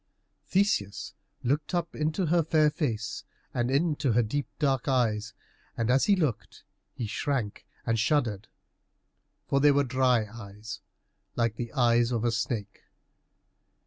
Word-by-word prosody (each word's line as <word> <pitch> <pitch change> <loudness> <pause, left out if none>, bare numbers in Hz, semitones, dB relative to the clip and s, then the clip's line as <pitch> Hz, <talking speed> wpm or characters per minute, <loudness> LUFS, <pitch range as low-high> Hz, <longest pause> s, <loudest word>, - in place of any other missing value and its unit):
Theseus 185 - 0 0.3
looked 145 +7 0
up 170 -1 -2
into 155 +5 0
her 170 +2 +3
fair 155 -1 +3
face 115 -8 -2 0.3
and 120 0 0
into 145 -2 +1
her 120 +2 +4
deep 140 +6 -2
dark 135 -4 +1
eyes, 115 -5 +1 0.4
and 115 +1 +1
as 135 +1 +4
he 205 - +5
looked 120 - -2 0.3
he 120 - -3
shrank 115 0 -2 0.2
and 115 0 +1
shuddered, 110 -6 +1 1.0
for 140 - +2
they 145 +1 +6
were 140 0 +3
dry 130 -3 +2
eyes 105 0 -9 0.6
like 115 -2 +1
the 120 +1 -5
eyes 120 -3 +3
of 120 -1 0
a 120 - +3
snake. 110 -3 -3
125 Hz, 140 wpm, -28 LUFS, 115-145 Hz, 1.0 s, they